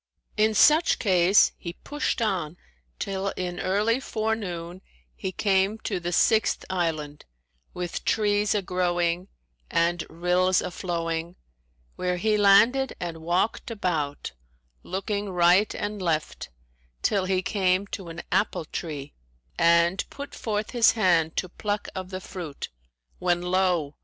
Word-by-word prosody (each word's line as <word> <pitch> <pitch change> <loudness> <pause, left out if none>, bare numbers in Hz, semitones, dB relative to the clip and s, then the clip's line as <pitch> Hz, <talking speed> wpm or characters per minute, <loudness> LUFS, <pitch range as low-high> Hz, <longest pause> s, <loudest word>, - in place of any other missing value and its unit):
In 215 0 +2
such 310 - +5
case 190 -1 +4
he 170 - -6
pushed 290 +1 -2
on 180 -6 -1 0.4
till 195 0 -3
in 180 -1 -3
early 210 +6 +1
forenoon 200 -8 -3 0.3
he 190 - -4
came 195 +2 +1
to 195 -4 -2
the 175 0 -3
sixth 220 +4 +2
island, 155 -5 -2 0.5
with 180 -1 -4
trees 210 -1 +1
a 205 - 0
growing 175 0 0 0.4
and 170 0 +1
rills 180 +2 +2
a - - -3
flowing, 170 -1 -3 0.6
where 180 0 -1
he 215 +4 +1
landed 225 +7 +4
and 170 -2 -4
walked 175 +9 0
about, 165 -10 -2 0.5
looking 200 +2 -3
right 180 +3 +4
and 205 -1 -4
left, 160 -4 -2 0.5
till 195 -2 +2
he 185 0 0
came 190 -1 +1
to 190 -3 -7
an 165 +1 -7
apple 200 -5 +1
tree 150 -3 -6 0.4
and 170 +2 +3
put 280 0 -8
forth 215 -1 -3
his 240 -2 +5
hand 170 -7 +2
to 185 - 0
pluck 205 +3 -3
of 185 -1 -6
the 185 -1 -5
fruit, 170 -6 -7 0.5
when 175 -1 +1
lo! 180 -5 +1
185 Hz, 130 wpm, -26 LUFS, 170-205 Hz, 0.6 s, such